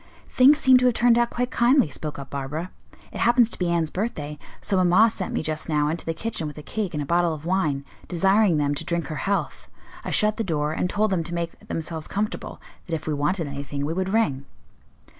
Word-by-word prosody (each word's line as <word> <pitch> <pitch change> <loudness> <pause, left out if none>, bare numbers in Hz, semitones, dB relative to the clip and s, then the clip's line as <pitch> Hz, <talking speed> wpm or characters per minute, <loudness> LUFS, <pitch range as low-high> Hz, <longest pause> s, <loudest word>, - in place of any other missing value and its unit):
"Things 275 +4 +6
seem 260 -4 +6
to 250 - +1
have 245 -2 +3
turned 240 -1 +4
out 240 0 +2
quite 245 +1 -2
kindly," 245 - +3
spoke 150 +3 -5
up 140 -1 -9
Barbara. 145 +6 -4 0.4
"It - - -7
happens 235 0 +4
to - - -3
be 180 -2 0
Anne's 165 -2 0
birthday, 150 -8 -4 0.2
so 195 - -2
mamma 195 +6 +5
sent 190 - -4
me - - -2
just 155 +1 -3
now 150 -1 +2
into 165 +1 -4
the 165 - 0
kitchen 215 -7 -3
with 150 - -8
a 150 - -8
cake 200 -3 -3
and 150 - -1
a - - -6
bottle 170 +1 +1
of 155 +1 -11
wine, 155 -7 0 0.2
desiring 190 0 +3
them 145 -1 +1
to 145 - -4
drink 170 -1 -2
her 155 - -4
health. 200 0 -2 0.4
I - - -4
shut 210 0 +2
the 225 - -1
door 155 -5 -1
and 180 - -1
told 215 +1 +1
them 175 -3 +1
to 170 +1 -5
make 170 -1 -5
themselves 160 -1 -4
comfortable; 210 +2 -4 0.3
that 165 - -1
if 155 - -6
we 155 - -1
wanted 155 +4 0
anything 140 0 -4
we 155 - -2
would 190 +2 -2
ring." 190 -11 0
170 Hz, 235 wpm, -24 LUFS, 150-215 Hz, 0.4 s, Things